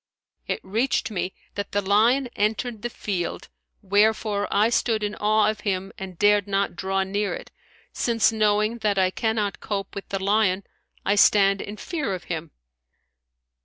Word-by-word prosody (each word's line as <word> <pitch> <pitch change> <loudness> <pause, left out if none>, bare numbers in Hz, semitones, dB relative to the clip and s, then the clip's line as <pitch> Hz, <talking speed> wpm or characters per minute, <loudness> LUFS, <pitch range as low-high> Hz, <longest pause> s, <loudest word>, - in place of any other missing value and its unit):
It - - -1
reached 225 +4 0
me 190 -2 -2 0.2
that 200 -1 -5
the 205 - +2
lion 220 +7 +3
entered 215 +2 -1
the 240 - -3
field 190 -6 -4 0.3
wherefore 205 +1 +2
I 215 +2 +3
stood 225 -2 +1
in 210 0 -1
awe 215 0 +2
of 215 0 -1
him 195 -2 -2
and 190 -2 -8
dared 205 0 +4
not 195 -2 0
draw 195 +1 0
near 200 +1 -1
it, - - -10 0.4
since 230 -2 +2
knowing 215 +1 +1
that 210 -2 0
I 185 -1 +3
cannot 220 -1 -1
cope 200 -2 -4
with 200 - -7
the 195 - -1
lion, 200 -1 +2 0.4
I 200 - +3
stand 200 -1 +5
in 205 +1 -7
fear 290 - -3
of 180 - -8
him." 160 0 -5
205 Hz, 165 wpm, -24 LUFS, 195-220 Hz, 0.4 s, stand